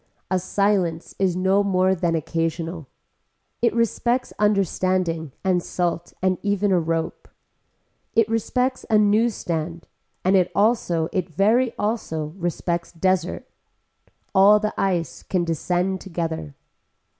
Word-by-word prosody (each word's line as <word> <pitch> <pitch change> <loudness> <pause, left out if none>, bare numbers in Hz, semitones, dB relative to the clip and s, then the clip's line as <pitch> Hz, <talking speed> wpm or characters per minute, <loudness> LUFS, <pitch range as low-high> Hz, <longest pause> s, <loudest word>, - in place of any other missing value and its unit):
A 185 - +2
silence 185 -3 0
is 190 -3 +2
no 190 +2 +2
more 185 -1 +2
than 170 -2 0
occasional. 165 0 -2 0.7
It 235 -1 +3
respects 235 +2 0
understanding 185 -5 +1
and 185 -2 +2
salt 175 -1 -2
and 185 -1 +2
even 205 0 +1
a 180 - +4
rope. 165 0 -2 0.9
It 230 -2 +4
respects 250 +3 0
a 220 - +5
news 210 +2 +3
stand 165 0 -4 0.4
and 190 +1 +4
it 180 -2 +3
also 200 -7 +2
it 185 -4 -1
very 220 - +2
also 160 -8 -2
respects 175 -1 -2
desert. 180 0 -1 0.9
All 205 +2 +7
the 215 0 -2
ice 180 -4 -1
can 180 -2 -1
descend 180 +3 -1
together. 165 -5 -4
185 Hz, 120 wpm, -23 LUFS, 165-205 Hz, 0.9 s, All